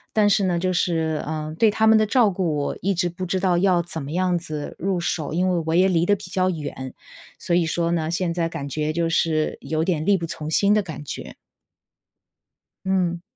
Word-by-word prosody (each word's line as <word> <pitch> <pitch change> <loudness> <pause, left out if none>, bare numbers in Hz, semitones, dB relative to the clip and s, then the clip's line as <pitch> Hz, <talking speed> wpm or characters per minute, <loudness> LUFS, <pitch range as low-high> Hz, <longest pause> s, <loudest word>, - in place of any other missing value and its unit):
但 210 -1 +4
是 200 0 +3
呢 175 -2 +1
就 185 +1 0
是， 160 -3 0
呃， 155 0 -4
对 225 - +5
他 220 +1 +2
们 220 0 +7
的 215 - +3
照 225 -1 +3
顾 175 -4 -1
我 145 - -2
一 195 +2 +1
直 175 0 0
不 185 +2 -6
知 185 +1 -1
道 180 -2 +2
要 180 -1 +3
怎 160 -1 -6
么 140 +2 -6
样 180 0 +1
子 155 -3 -6
入 190 0 0
手， 160 -3 -2
因 180 +3 +1
为 175 -3 0
我 160 - +1
也 185 +2 +5
离 170 -2 +2
得 205 - +3
比 - - -12
较 185 -1 +1
远。 145 -6 -5 0.5
所 170 - 0
以 175 -1 +3
说 170 +1 0
呢， 160 -2 0
现 170 -1 -1
在 170 -1 0
感 140 -4 -5
觉 150 +2 -1
就 165 0 0
是 155 -1 +1
有 155 +3 -1
点 160 -3 -1
力 200 0 +4
不 170 - -4
从 155 -1 -6
心 200 +6 +3
的 210 - +3
感 155 -5 -7
觉。 - - -7 1.5
嗯。 180 -3 0
170 Hz, 245 characters per minute, -23 LUFS, 160-185 Hz, 1.5 s, 们